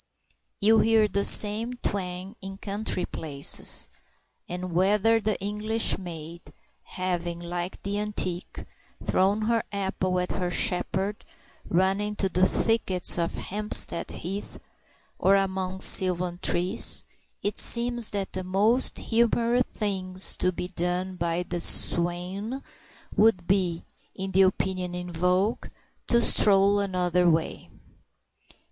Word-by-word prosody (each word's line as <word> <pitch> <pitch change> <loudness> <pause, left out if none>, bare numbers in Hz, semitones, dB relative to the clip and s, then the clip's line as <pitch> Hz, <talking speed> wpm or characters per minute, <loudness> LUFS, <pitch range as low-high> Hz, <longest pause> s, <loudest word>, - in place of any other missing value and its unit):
You 220 +2 +4
hear 220 -1 +3
the 200 -1 -2
same 220 +5 +6
twang 190 -3 -4
in 195 0 -8
country 200 -2 -4
places; 140 -3 -2 0.6
and 180 0 -6
whether 210 +5 +2
the 215 -2 -1
English 210 +3 0
maid, 170 -2 -9 0.4
having, 175 -2 -4
like 175 +1 -6
the 200 +1 -3
antique, 190 -4 -4 0.4
thrown 200 +3 +1
her 230 +1 +1
apple 190 -2 -2
at 180 - -3
her 180 -1 -3
shepherd, 190 +3 -2 0.5
run 190 +3 +1
into 210 -2 -1
the 185 +1 +2
thickets 190 -6 0
of 170 0 -2
Hampstead 210 -3 +1
Heath 195 +4 -7 0.6
or 195 +1 +3
among 190 -1 -2
sylvan 180 -2 +2
trees, 175 +2 +4 0.4
it 205 - -2
seems 240 -1 +3
that 200 -2 -5
the 185 - -3
most 210 +7 +1
humorous 235 +1 +1
thing 190 -3 -4 0.2
to 180 - +1
be 180 0 -6
done 180 +1 -3
by 170 0 -2
the 175 0 -5
swain 180 +10 +1 0.5
would 205 -5 +2
be, 180 -3 0 0.3
in 190 0 -5
the 190 +1 +3
opinion 185 -1 -1
in 180 0 -6
vogue, 180 +5 0 0.4
to 235 -1 +3
stroll 200 0 +4
another 180 -2 +1
way. 160 -1 -2
190 Hz, 120 wpm, -25 LUFS, 180-210 Hz, 0.6 s, same